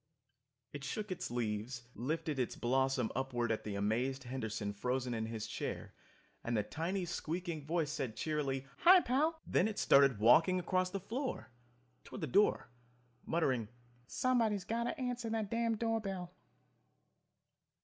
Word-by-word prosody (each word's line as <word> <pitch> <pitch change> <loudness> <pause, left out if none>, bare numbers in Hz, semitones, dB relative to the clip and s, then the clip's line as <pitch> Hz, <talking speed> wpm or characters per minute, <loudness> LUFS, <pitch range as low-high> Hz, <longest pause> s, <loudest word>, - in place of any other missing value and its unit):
It 145 -1 -6
shook 210 +9 -4
its 185 - -3
leaves, 120 +1 -3
lifted 155 +3 -2
its 125 - -1
blossom 130 -1 +1
upward 120 -3 -1
at 110 - -1
the 105 -2 -4
amazed 120 +7 0
Henderson 110 -5 -3
frozen 125 +3 -1
in 110 -1 -2
his 110 -1 -4
chair, - - -5 0.5
and 115 -1 0
the 105 - +2
tiny 175 - -2
squeaking 170 -2 -4
voice 160 -2 0
said 130 -7 -3
cheerily, 135 0 -1
"Hi, 365 +1 +8
Pal!" 310 +6 +1
Then 195 - +2
it 215 - -4
started 140 -4 +5
walking 160 - +5
across 185 +1 +1
the 195 +1 -3
floor, 245 - -4 0.5
toward - - -9
the - - 0
door, 200 +4 +2 0.6
muttering, 130 -9 +1 0.4
"Somebody's 225 - +1
got 235 +1 -1
to 310 - -3
answer 245 -2 -2
that 220 -2 -2
damned 230 -1 +1
door 225 0 0
bell." 185 -3 -5
150 Hz, 150 wpm, -35 LUFS, 120-200 Hz, 0.6 s, Hi